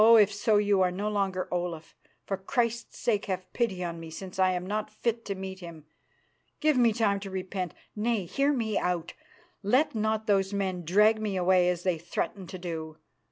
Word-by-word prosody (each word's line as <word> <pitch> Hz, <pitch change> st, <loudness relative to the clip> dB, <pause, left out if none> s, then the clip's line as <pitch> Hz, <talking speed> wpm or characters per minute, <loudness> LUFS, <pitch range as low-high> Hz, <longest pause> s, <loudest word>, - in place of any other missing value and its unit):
if 210 Hz, 0 st, +4 dB
so, 210 Hz, +1 st, +2 dB
you 205 Hz, -2 st, +3 dB
are 185 Hz, -, +4 dB
no 195 Hz, +4 st, -3 dB
longer 195 Hz, -3 st, 0 dB
Olaf. 175 Hz, -2 st, -3 dB, 0.3 s
For 195 Hz, -, -1 dB
Christ's 235 Hz, +3 st, -1 dB
sake 210 Hz, -4 st, 0 dB
have 185 Hz, -1 st, -4 dB
pity 200 Hz, -7 st, 0 dB
on 170 Hz, -1 st, -4 dB
me, 165 Hz, -1 st, -8 dB
since 185 Hz, +4 st, -8 dB
I 185 Hz, 0 st, +5 dB
am 180 Hz, 0 st, -3 dB
not 210 Hz, +2 st, -2 dB
fit 230 Hz, +2 st, -2 dB
to 200 Hz, -, -3 dB
meet 190 Hz, 0 st, -6 dB
Him. 170 Hz, -4 st, -10 dB, 0.7 s
Give 305 Hz, -1 st, +3 dB
me 240 Hz, -2 st, +5 dB
time 210 Hz, -3 st, +1 dB
to 195 Hz, 0 st, -7 dB
repent. 185 Hz, -2 st, -4 dB, 0.2 s
Nay! 215 Hz, -2 st, 0 dB
hear 275 Hz, -, +1 dB
me 225 Hz, -6 st, 0 dB
out! 175 Hz, -2 st, -1 dB, 0.5 s
Let 250 Hz, +9 st, +3 dB
not 220 Hz, 0 st, 0 dB
those 195 Hz, -2 st, +2 dB
men 190 Hz, -3 st, -1 dB
drag 210 Hz, +6 st, +4 dB
me 210 Hz, -3 st, -1 dB
away 180 Hz, 0 st, +4 dB
as 175 Hz, -1 st, -2 dB
they 180 Hz, -3 st, +1 dB
threaten 180 Hz, +3 st, -3 dB
to 185 Hz, -, -7 dB
do. 160 Hz, -3 st, -5 dB
195 Hz, 195 wpm, -28 LUFS, 180-215 Hz, 0.7 s, I